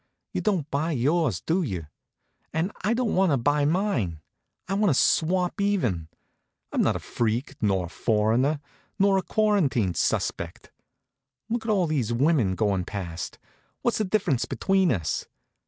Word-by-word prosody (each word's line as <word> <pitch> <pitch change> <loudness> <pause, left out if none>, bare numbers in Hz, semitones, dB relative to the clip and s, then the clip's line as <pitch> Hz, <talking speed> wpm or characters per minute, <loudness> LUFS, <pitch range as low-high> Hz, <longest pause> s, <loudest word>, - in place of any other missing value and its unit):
You - - -1
don't 190 -9 0
buy 155 +4 0
yours, 145 - +1
do 175 +4 +1
you? 95 - -3 0.7
And 165 +5 -1
I 215 +4 +2
don't 245 -2 0
want 185 -2 +3
to - - +3
buy 145 +4 +2
mine. 145 - 0 0.5
I 195 - -2
want 205 0 +3
to 135 - +3
swap 180 +3 +2
even. 125 - 0 0.6
I'm - - +1
not - - +2
a - - -2
freak, 120 +3 -2
nor 95 -4 +1
a - - -9
foreigner, 115 - +1 0.4
nor 195 -1 +4
a - - -2
quarantine 175 - +1
suspect. 85 0 -2 0.8
Look 230 0 -2
at - - +2
all 190 -4 +3
these 140 -8 -1
women 120 - +2
going 100 -3 +1
past 90 -3 -5 0.5
what's 235 - +1
the - - +2
difference 185 - +1
between 190 -3 +2
us? 85 - -2
150 Hz, 155 wpm, -26 LUFS, -, 0.8 s, nor